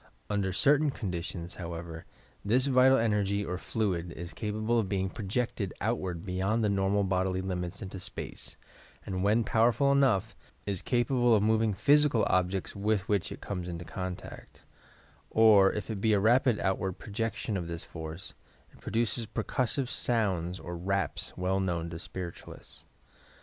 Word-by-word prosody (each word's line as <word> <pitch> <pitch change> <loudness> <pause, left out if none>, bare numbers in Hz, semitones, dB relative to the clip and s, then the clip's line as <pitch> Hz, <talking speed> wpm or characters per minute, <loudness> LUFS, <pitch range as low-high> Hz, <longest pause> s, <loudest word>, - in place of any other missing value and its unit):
Under 100 -2 0
certain 145 +9 +4
conditions, 90 -6 -4
however, 85 -1 -6 0.4
this 125 +6 +3
vital 130 0 +5
energy 105 -3 +1
or 90 0 -3
fluid 90 -7 -2
is 85 0 -7
capable 110 +4 0
of 100 -4 -1
being 95 -2 -1
projected 105 -1 -2
outward 95 -6 -2
beyond 95 +4 0
the 105 - +2
normal 100 +1 +2
bodily 95 0 0
limits 90 +1 -4
into 95 0 -7
space, - - -7 0.5
and, 95 -1 -2
when 110 +3 +3
powerful 120 +6 +3
enough, 135 -9 +2 0.3
is 100 -3 -2
cap 120 0 0
able 120 -3 +4
of 105 - +2
moving 110 0 +3
physical 145 +3 +3
objects 95 +1 0
with 100 -1 0
which 100 -4 0
it - - -8
comes 90 -3 -4
into 85 0 -6
contact; 90 +2 -7 0.7
or 105 -3 +6
if 105 +1 -4
it 100 -3 -4
be 110 0 +3
a 100 - +4
rapid 120 +2 +4
outward 95 0 0
projection 110 +2 -3
of 90 -3 -3
this 85 0 -5
force, 80 +2 -8 0.4
it - - -20
produces 115 0 -1
percussive 125 +4 -1
sounds 95 -9 0
or 85 0 -6
raps 95 -1 -2
well 95 +1 0
known 85 -3 -2
to 80 - -6
Spiritualists. 90 0 -8
100 Hz, 155 wpm, -30 LUFS, 90-115 Hz, 0.7 s, or